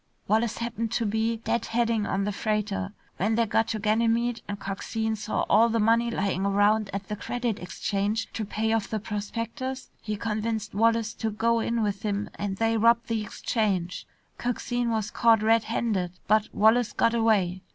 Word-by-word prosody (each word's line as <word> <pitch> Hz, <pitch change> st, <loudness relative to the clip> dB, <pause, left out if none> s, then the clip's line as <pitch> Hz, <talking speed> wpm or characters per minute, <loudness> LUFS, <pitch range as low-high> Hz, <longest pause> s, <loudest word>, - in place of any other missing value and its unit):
Wallace 220 Hz, +2 st, +1 dB
happened 230 Hz, -1 st, -3 dB
to 230 Hz, -, 0 dB
be 220 Hz, +2 st, 0 dB
dead 230 Hz, 0 st, -1 dB
heading 230 Hz, -2 st, +1 dB
on 195 Hz, +1 st, 0 dB
the 205 Hz, -, -1 dB
freighter. 200 Hz, -1 st, -2 dB, 0.3 s
When 215 Hz, +4 st, +1 dB
they 230 Hz, 0 st, +3 dB
got 225 Hz, +1 st, +1 dB
to 220 Hz, -, -2 dB
Ganymede, 230 Hz, +3 st, +1 dB
and 205 Hz, 0 st, -5 dB
Coxine 220 Hz, +3 st, -2 dB
saw 215 Hz, 0 st, -2 dB
all 230 Hz, +2 st, +5 dB
the 230 Hz, 0 st, +1 dB
money 230 Hz, +2 st, +3 dB
lying 195 Hz, -4 st, -1 dB
around 205 Hz, +1 st, +3 dB
at 195 Hz, 0 st, -5 dB
the 210 Hz, -, -3 dB
Credit 240 Hz, 0 st, -3 dB
Exchange 200 Hz, +4 st, -2 dB
to 220 Hz, -, -3 dB
pay 220 Hz, +2 st, -1 dB
off 225 Hz, -2 st, 0 dB
the 220 Hz, -, -2 dB
prospectors, 230 Hz, +5 st, -4 dB
he 215 Hz, -1 st, -3 dB
convinced 220 Hz, -1 st, -2 dB
Wallace 225 Hz, +1 st, +2 dB
to 225 Hz, -, -2 dB
go 230 Hz, +2 st, +1 dB
in 230 Hz, 0 st, 0 dB
with 205 Hz, -1 st, -1 dB
him 205 Hz, -1 st, -2 dB
and 200 Hz, -1 st, -4 dB
they 225 Hz, +1 st, +2 dB
robbed 235 Hz, +2 st, +3 dB
the 225 Hz, -1 st, 0 dB
Exchange. 200 Hz, -4 st, -2 dB, 0.3 s
Coxine 245 Hz, 0 st, -1 dB
was 220 Hz, -2 st, -1 dB
caught 225 Hz, -2 st, +4 dB
red 225 Hz, 0 st, +4 dB
handed, 205 Hz, -6 st, -1 dB
but 215 Hz, +1 st, +3 dB
Wallace 220 Hz, +1 st, +3 dB
got 230 Hz, -, +2 dB
away. 205 Hz, -6 st, +2 dB
220 Hz, 180 wpm, -27 LUFS, 205-230 Hz, 0.3 s, all